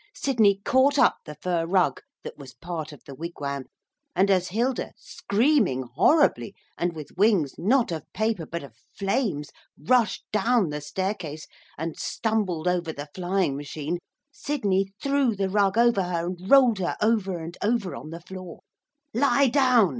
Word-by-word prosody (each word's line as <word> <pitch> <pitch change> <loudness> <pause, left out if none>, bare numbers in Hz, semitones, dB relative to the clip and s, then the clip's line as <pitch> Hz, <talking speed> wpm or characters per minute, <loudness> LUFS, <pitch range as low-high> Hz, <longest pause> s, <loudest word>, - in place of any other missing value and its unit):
Sidney 215 -7 +3
caught 275 +3 +4
up - - +4
the 150 - -8
fur 170 +2 -1
rug 185 0 +2 0.2
that - - -7
was 135 -3 -12
part 165 -3 -6
of 145 - -14
the 140 - -9
wigwam, 140 -3 -5 0.5
and 195 +1 +3
as 185 -1 +2
Hilda, 240 +6 -1
screaming 210 - +1
horribly, 300 - +3 0.2
and 175 -1 -2
with 155 -2 -9
wings 195 -8 +3
not 230 +3 +2
of 160 -3 -6
paper 215 -7 -1
but 170 -1 -5
of 135 -5 -12 0.2
flames, 195 - -1 0.3
rushed 230 - +1
down 215 -4 +2
the 150 0 -4
staircase, 175 -2 -4 0.3
and 160 +1 -5
stumbled 200 -7 -1
over 175 -2 0
the 145 -1 -8
flying 185 -5 0
machine, 150 +4 -4 0.3
Sidney 200 -11 0 0.2
threw 275 -5 +2
the 195 -1 -1
rug 200 +1 +2
over 235 -4 +4
her, 175 -2 -2
and 180 +2 -6
rolled 255 -7 +6
her 180 - -2
over 210 -4 +1
and 165 +1 -7
over 210 -4 0
on 155 - -8
the 165 +1 -8
floor. 185 -1 -9 0.5
'Lie 275 +2 +3
down!' 250 -6 +4
190 Hz, 160 wpm, -25 LUFS, 165-230 Hz, 0.5 s, rolled